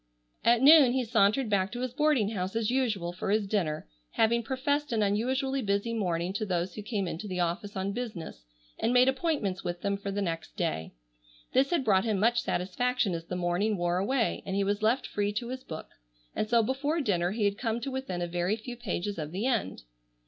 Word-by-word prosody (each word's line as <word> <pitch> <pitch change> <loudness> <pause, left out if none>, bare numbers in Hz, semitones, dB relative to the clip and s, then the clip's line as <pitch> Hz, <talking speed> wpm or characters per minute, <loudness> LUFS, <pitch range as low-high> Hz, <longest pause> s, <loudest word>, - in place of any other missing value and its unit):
At 235 +2 +4
noon 285 -4 +8
he 260 -1 +1
sauntered 225 +2 +3
back 200 -2 +1
to 245 - -4
his 255 -1 -3
boarding 295 -8 +2
house 190 -2 -3
as 225 0 0
usual 215 -10 0
for 180 - -4
his 210 0 +2
dinner, 180 -7 -1 0.3
having 235 +1 +3
professed 275 +4 -1
an 220 -2 +2
unusually 260 +7 0
busy 200 +1 0
morning 180 -4 -1
to 200 - -2
those 180 -2 -1
who 215 - -6
came 205 -3 -2
in 165 - -4
to 210 - -6
the 185 -2 -3
office 180 +5 -2
on 190 +1 -1
business 200 - -6 0.4
and 235 - +1
made 250 +1 +6
appointments 265 - 0
with 175 0 -4
them 200 0 0
for 200 0 -5
the 200 +1 -2
next 165 -4 -3
day. 155 - -2 0.6
This 270 +1 +4
had 340 -6 +1
brought 195 -3 +3
him 215 -3 +1
much 235 +3 +3
satisfaction 220 +4 0
as 165 0 -4
the 180 - -4
morning 180 +4 0
wore 175 0 0
away 235 +4 0
and 190 - -3
he 200 - +2
was 205 +1 0
left 235 +4 +2
free 205 0 -1
to 235 +3 -3
his 260 +1 -5
book, 155 -1 -8 0.5
and 215 - -1
so 235 -1 +4
before 285 +7 0
dinner 180 - +1
he 210 +2 -1
had 200 +1 0
come 230 -1 -1
to 270 +3 -4
within 260 -10 -3
a - - -2
very 175 +4 0
few 240 +2 -8
pages 205 -5 -3
of 150 -1 -4
the 195 +7 -2
end. 235 - -1
210 Hz, 220 wpm, -29 LUFS, 185-245 Hz, 0.6 s, noon